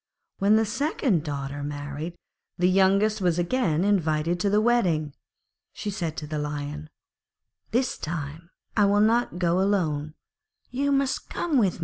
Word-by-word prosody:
When 200 +2 +4
the 220 0 +3
second 255 - 0
daughter 145 -2 -4
married, 145 +3 -5
and - - -32 0.5
the - - +6
youngest 195 +3 +3
was 175 -2 +2
again 175 -3 +1
invited 170 -4 +1
to 200 - +1
the 205 +1 +3
wedding, 180 -11 +2 0.6
she 210 - -4
said 170 -6 -3
to 150 - -4
the 150 0 -3
Lion, 150 +1 -4 0.8
'This 250 +2 0
time 160 +1 -5 0.3
I 210 - +4
will 200 +1 +3
not 225 -1 +2
go 175 0 +2
alone, 155 -7 0 0.6
you 280 +3 0
must 275 -1 0
come 300 -7 +1
too.' 190 -5 +1
175 Hz, 150 wpm, -26 LUFS, 155-215 Hz, 0.8 s, the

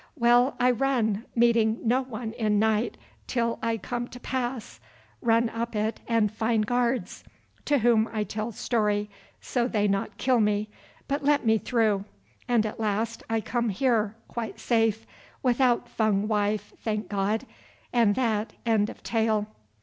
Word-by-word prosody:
Well, 245 0 +4
I 250 +1 +4
run, 235 -4 0
meeting 230 -2 +3
no 245 +3 +2
one 235 -3 -6
in 215 -3 +1
night, 220 +2 +1 0.3
till 235 -2 -1
I 230 0 0
come 240 +2 -4
to 245 - -11
pass, 250 -2 -4 0.4
run 230 0 +3
up 230 0 -4
it, 215 +1 -1
and 225 -3 +2
find 220 0 0
guards, 245 -3 -1 0.4
to 290 - +3
whom 230 -2 +3
I 215 -2 -1
tell 215 +2 -4
story, 210 -2 0 0.3
so 245 -2 0
they 210 -4 +1
not 195 0 -1
kill 255 -2 +2
me, 210 0 +1 0.4
but 285 +1 -1
let 285 -2 +2
me 220 0 +4
through, 215 -5 +1 0.4
and 235 -3 +3
at 215 - -5
last 220 +1 -1
I 225 0 +1
come 235 +2 -1
here, 220 -1 +1
quite 230 -2 -5
safe, 225 -2 +1 0.4
without 245 -1 +2
Fung 215 -3 +1
wife, 210 -1 -1
thank 215 -1 -2
God, 205 +4 -1 0.5
and 230 -4 +4
that 225 -4 0
end 220 -2 +2
of - - -11
tale." 220 -2 +1
225 Hz, 155 wpm, -27 LUFS, 215-240 Hz, 0.5 s, Well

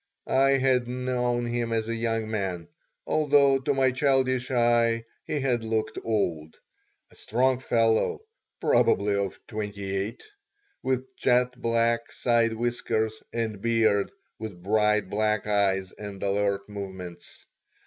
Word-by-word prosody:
I 135 +1 +3
had 130 -2 +2
known 125 -1 -1
him 120 -1 -2
as 110 -1 0
a 115 - -1
young 115 -1 -1
man, 95 -5 -3 0.4
although 140 -3 +4
to 135 +2 -1
my 130 -1 +3
childish 130 -1 +1
eye 120 -2 +2 0.2
he 150 - -2
had 125 -4 0
looked 110 -1 -2
old 85 -8 -1 0.6
a - - -19
strong 130 +3 +1
fellow, 115 - +1 0.4
probably 100 +1 +3
of 100 -1 -1
twenty 100 -2 -4
eight, 100 +5 -3 0.6
with 130 0 -2
jet 125 0 +3
black 115 0 +1
side 115 -2 +2
whiskers 110 -2 -1
and 110 -4 -3
beard, 110 -3 +2 0.3
with 100 -6 -7
bright, 105 0 +2
black 105 +1 0
eyes 95 -3 +1
and 100 -2 -8
alert 100 0 0
movements. 95 -4 -8
115 Hz, 130 wpm, -26 LUFS, 100-125 Hz, 0.6 s, although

